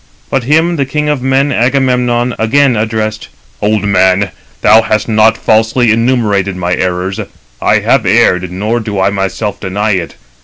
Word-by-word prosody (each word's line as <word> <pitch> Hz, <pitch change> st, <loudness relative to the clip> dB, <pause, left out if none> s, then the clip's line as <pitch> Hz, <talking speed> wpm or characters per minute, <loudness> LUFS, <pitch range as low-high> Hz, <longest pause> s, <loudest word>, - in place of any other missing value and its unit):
But 135 Hz, -3 st, -1 dB
him 160 Hz, +5 st, +2 dB
the 140 Hz, -, 0 dB
king 150 Hz, +1 st, -2 dB
of 145 Hz, -3 st, -1 dB
men, 135 Hz, +2 st, +1 dB
Agamemnon, 125 Hz, -1 st, 0 dB
again 130 Hz, +3 st, +2 dB
addressed: 110 Hz, 0 st, -3 dB, 0.3 s
"Old 105 Hz, -1 st, 0 dB
man, 95 Hz, -1 st, +2 dB, 0.3 s
thou 110 Hz, +2 st, +5 dB
hast 110 Hz, -1 st, -1 dB
not 110 Hz, 0 st, +3 dB
falsely 110 Hz, +2 st, +2 dB
enumerated 110 Hz, -5 st, 0 dB
my 90 Hz, -1 st, -2 dB
errors. 90 Hz, +1 st, -2 dB, 0.4 s
I -, -, +2 dB
have -, -, +1 dB
erred, 90 Hz, 0 st, +2 dB
nor 105 Hz, +6 st, -2 dB
do 105 Hz, -3 st, -4 dB
I 95 Hz, +1 st, +1 dB
myself 100 Hz, +1 st, -3 dB
deny 105 Hz, +3 st, -2 dB
it. 90 Hz, -4 st, -3 dB
110 Hz, 155 wpm, -12 LUFS, 100-125 Hz, 0.4 s, thou